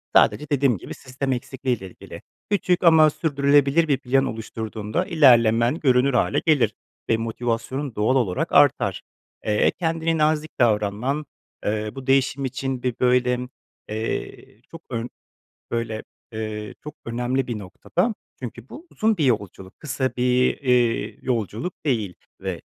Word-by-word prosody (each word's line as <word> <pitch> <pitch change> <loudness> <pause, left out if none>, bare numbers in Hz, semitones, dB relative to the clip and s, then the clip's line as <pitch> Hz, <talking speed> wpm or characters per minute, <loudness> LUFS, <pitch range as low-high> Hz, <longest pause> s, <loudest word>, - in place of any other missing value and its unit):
sadece 150 -1 +4
dediğim 140 -5 +2
gibi - - -8
sistem 135 +1 -4
eksikliği 130 -1 -2
ile 95 -2 -9
ilgili. - - -11 0.3
Küçük 185 -3 +1
ama 160 -2 +7
sürdürülebilir 145 +1 +2
bir 140 -3 +2
plan 135 +1 +1
oluşturduğunda 110 - -4
ilerlemen 120 - +4
görünür 130 -1 +3
hâle 135 +4 +2
gelir 155 -5 +3 0.4
ve 115 - +3
motivasyonun 120 +4 -3
doğal 110 +5 +2
olarak 105 -9 0
artar. - - +4 0.4
Eee, 105 -1 +3
kendine 165 -1 0
nazik 155 0 +1
davranman, 115 +6 +1 0.4
eee, 105 0 -1
bu 135 0 -8
değişim 135 0 +2
için, 130 0 -3
bi 125 - 0
böyle, 125 0 +3 0.5
eee, 110 0 -5
çok 165 0 -10
ön 120 0 -3 0.6
böyle, 115 -2 -2 0.3
eee, 110 -1 -5
çok 150 0 -7
önemli 125 +3 -1
bir 115 -3 -3
noktada; 175 - -2 0.3
çünkü 120 0 -7
bu 330 +5 -11
uzun 220 0 +1
bir 155 - +1
yolculuk, 100 -6 -2
kısa 130 -3 -1
bir, 125 0 +2
eee, 125 -4 +1
yolculuk 120 - -3
değil 110 -10 0 0.3
ve - - -4
125 Hz, 135 wpm, -23 LUFS, 115-145 Hz, 0.6 s, ama